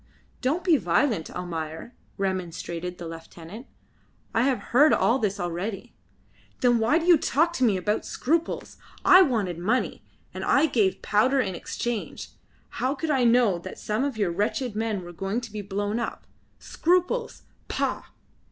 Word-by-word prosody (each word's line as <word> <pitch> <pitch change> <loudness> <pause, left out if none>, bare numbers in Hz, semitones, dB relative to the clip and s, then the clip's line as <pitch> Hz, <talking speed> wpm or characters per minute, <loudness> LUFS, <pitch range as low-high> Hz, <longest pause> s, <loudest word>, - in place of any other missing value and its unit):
"Don't 300 +7 0
be 340 -5 +4
violent, 195 - +1
Almayer," 165 +3 -5 0.2
remonstrated 180 -2 -3
the 170 - -7
lieutenant; 165 +7 -10 0.7
"I 225 - +2
have 260 0 +2 0.2
heard 295 +5 +6
all 250 +3 +3
this 205 -3 -1
already." 175 +4 -4 0.7
"Then 245 -2 +4
why 230 +8 +3
do 335 - -1
you 350 -3 +6
talk 325 +5 +2
to 260 - -1
me 215 -6 +3
about 210 +3 -1
scruples? 330 +4 -2 0.3
I 375 0 +9
wanted 210 - +1
money, 220 +9 -1 0.3
and - - -5
I - - +4
gave 220 -10 +1
powder 255 +7 +3
in 200 -7 0
exchange. 235 +6 -4 0.5
How 260 +3 +1
could 305 +3 -2
I 260 -4 +2
know 230 -6 +4
that 185 +2 -9
some 215 +5 -1
of 280 -5 -2
your 200 -5 +1
wretched 215 +5 -1
men 215 -3 -2
were 175 0 -9
going 195 +6 -2
to 235 -3 -9
be 210 - -4
blown 205 +3 -2
up? 235 - -5 0.3
Scruples! 365 +8 0 0.2
Pah!" - - -1
220 Hz, 160 wpm, -26 LUFS, 185-265 Hz, 0.7 s, I